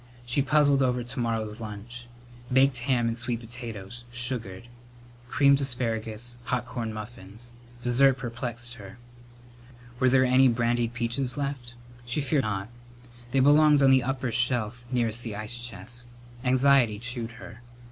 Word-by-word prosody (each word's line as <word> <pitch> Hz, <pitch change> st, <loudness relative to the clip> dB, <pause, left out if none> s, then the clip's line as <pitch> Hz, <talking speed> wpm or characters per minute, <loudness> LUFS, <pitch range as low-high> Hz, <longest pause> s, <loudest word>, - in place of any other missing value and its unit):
She 120 Hz, +4 st, +1 dB
puzzled 145 Hz, 0 st, +3 dB
over 125 Hz, -2 st, +1 dB
to 125 Hz, +3 st, -7 dB
morrow's 110 Hz, -2 st, -2 dB
lunch. 115 Hz, +3 st, -8 dB, 0.4 s
Baked 130 Hz, 0 st, +4 dB
ham 120 Hz, -3 st, +3 dB
and 115 Hz, -, -1 dB
sweet 120 Hz, 0 st, -3 dB
potatoes, 120 Hz, -2 st, -8 dB
sugared; 120 Hz, -6 st, -4 dB, 0.6 s
creamed 140 Hz, +2 st, +4 dB
asparagus; 120 Hz, -2 st, -2 dB
hot 125 Hz, -1 st, -1 dB
corn 115 Hz, -2 st, -4 dB
muffins. 110 Hz, +1 st, -9 dB, 0.3 s
Dessert 130 Hz, +2 st, +4 dB
perplexed 120 Hz, -1 st, -4 dB
her. 100 Hz, +3 st, -11 dB, 1.0 s
Were 130 Hz, -, +4 dB
there 130 Hz, 0 st, +4 dB
any 130 Hz, +1 st, +5 dB
brandied 120 Hz, 0 st, +1 dB
peaches 120 Hz, +3 st, -2 dB
left? 135 Hz, -4 st, -4 dB, 0.3 s
She 120 Hz, +5 st, -2 dB
feared 145 Hz, 0 st, +1 dB
not. 100 Hz, -3 st, -3 dB, 0.6 s
They 135 Hz, +2 st, +2 dB
belonged 145 Hz, +1 st, +6 dB
on 135 Hz, -, +6 dB
the 130 Hz, 0 st, +5 dB
upper 130 Hz, 0 st, -2 dB
shelf 120 Hz, 0 st, 0 dB
nearest 120 Hz, -2 st, +1 dB
the 115 Hz, -4 st, -5 dB
ice 110 Hz, +3 st, -5 dB
chest. 120 Hz, +3 st, -7 dB, 0.4 s
Anxiety 130 Hz, -3 st, +4 dB
chewed 120 Hz, 0 st, -4 dB
her. 115 Hz, 0 st, -11 dB
Mrs. 120 Hz, -, -22 dB
120 Hz, 145 wpm, -27 LUFS, 115-130 Hz, 1.0 s, belonged